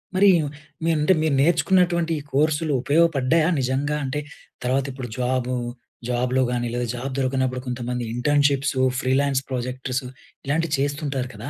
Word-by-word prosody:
మరి 200 +2 +6 0.6
మీరు 165 -1 +3
అంటే 155 +5 +4
మీరు 155 -3 +2
నేర్చుకున్నటువంటి 170 +1 +3 0.2
కోర్సులు 155 +2 +2
ఉపయోగపడ్డాయా? 160 +1 +3
నిజంగాంటే 140 +2 -1 0.5
తర్వాత 130 +2 +1
ఇప్పుడు 130 -1 -6
జాబు 125 0 0 0.5
జాబ్‌లో 125 +1 +1
గాని 120 -1 -1
లేదా 120 0 -1
జాబ్ 130 +3 -4
దొరకనప్పుడు 130 -1 0
కొంతమంది 125 0 -3
ఇంటర్న్‌షిప్సు, 140 0 +2 0.2
ఫ్రీలాన్స్ 135 +1 +1
ప్రొజెక్టర్సు 130 +1 -3 0.4
ఇలాంటివి 155 +2 0
చేస్తుంటారు 140 -2 -2
కదా! 110 +7 -7
135 Hz, 120 wpm, -23 LUFS, 125-150 Hz, 0.6 s, మరి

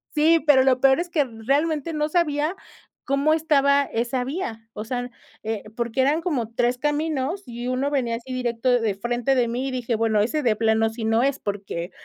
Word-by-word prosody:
sí, 320 +2 +5
pero 265 -3 +6
lo 260 -1 +2
peor 270 +2 +5
es 350 +1 -3
que 305 -4 +1
realmente 280 +7 -1
no 300 0 -1
sabía 310 0 0 0.5
como 275 +3 +2
estaba 285 -3 +3
esa 240 +1 -2
vía, 240 -7 -5
o 210 - -5
sea, 245 +2 -4 0.3
eh, 220 -1 -3
porque 235 +1 -1
eran 290 +5 +2
como 260 - -2
3 240 +2 +1
caminos 300 +4 -1
y 240 -1 -6
uno 255 +2 0
venía 255 -5 0
así 255 +2 -8
directo 245 -1 -1
de 215 -3 0
frente 240 +5 0
de 245 -2 +2
mí 245 +3 -2
y - - -5
dije: 245 -2 -2
"Bueno, 220 -1 +1
ese 295 +8 -1
de 230 -4 +2
plano 225 0 +2
sí 225 0 -6
no 225 +2 +2
es 275 0 0
porque, 195 -4 -5
255 Hz, 200 wpm, -23 LUFS, 230-295 Hz, 0.5 s, pero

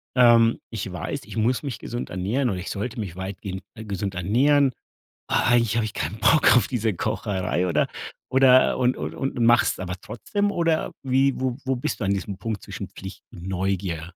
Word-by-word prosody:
ähm, 115 -2 +5
ich 100 -4 -5
weiß, 90 - -4
ich - - -9
muss 120 +5 +1
mich 130 -7 -4
gesund 120 +3 -5
ernähren 110 +9 -1
oder 95 -2 -2
ich 90 - -6
sollte 115 +3 -4
mich 95 -5 -5
weitgehend 95 0 -6
gesund 100 -4 -4
ernähren, 130 - +3 0.6
aber - - +2
eigentlich 115 -2 +3
habe 115 - +2
ich 105 - -5
keinen 110 - -3
Bock 145 +2 +5
auf 115 - +4
diese 115 -4 0
Kocherei“, 90 - -1
oder 85 -4 +2 0.4
oder 130 -1 +5
und 125 0 +2
und - - -5
und 135 - -3
machst's 120 +1 +4
aber 90 -1 -4
trotzdem 205 - -2
oder 165 -2 0
wie 135 +1 +2
wo 130 -2 -1
wo 130 0 0
bist 125 - -3
du - - -1
an 100 - +1
diesem 100 0 -4
Punkt 105 0 -4
zwischen - - -7
Pflicht 95 +1 -10
und 90 +1 -10
Neugier? 90 -3 -2
110 Hz, 190 wpm, -24 LUFS, 95-125 Hz, 0.6 s, ähm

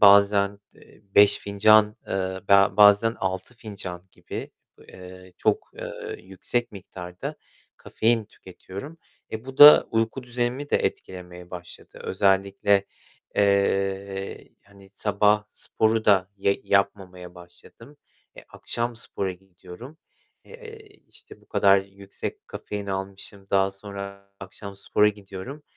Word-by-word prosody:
bazen, 100 0 +5 0.2
eee, - - -20
5 100 0 +6
fincan, 105 +1 +4
eee, - - -6 0.4
be 100 0 +5
bazen 105 +2 +6
6 95 +5 -3
fincan 100 -6 -8
gibi, - - -8 0.4
eee, 90 0 -13
çok, - - 0
eee, - - -7
yüksek 95 +6 -3
miktarda 90 -2 -8 0.4
kafein 115 0 0
tüketiyorum. 100 - -11 0.3
E, 110 +1 -5
bu 135 0 -10
da 145 +1 +10
uyku 115 +3 -1
düzenimi 125 +3 -2
de - - +4
etkilemeye 90 -1 -5
başladı. 90 -1 -11
Özellikle, 100 +1 +2 0.5
eee, 100 -1 0 0.2
hani 100 -1 -19
sabah 105 +1 +1
sporu 110 +1 -1
da 95 -2 +3
ye 100 0 0
yapmamaya 95 -3 -1
başladım. 90 +10 -16 0.4
E, - - -10
akşam 120 0 -3
spora 95 -4 -4
gidiyorum. 95 - -13 0.5
Eee, 460 -2 -12 0.3
işte - - -15
bu - - -27
kadar 100 0 +4
yüksek 95 0 -8
kafein 105 -1 -6
almışım. 95 0 -6
Daha 95 0 +3
sonra 100 0 -9
akşam 100 +1 -10
spora 105 +1 +2
gidiyorum. 105 +7 -8
100 Hz, 115 wpm, -25 LUFS, 95-110 Hz, 0.5 s, da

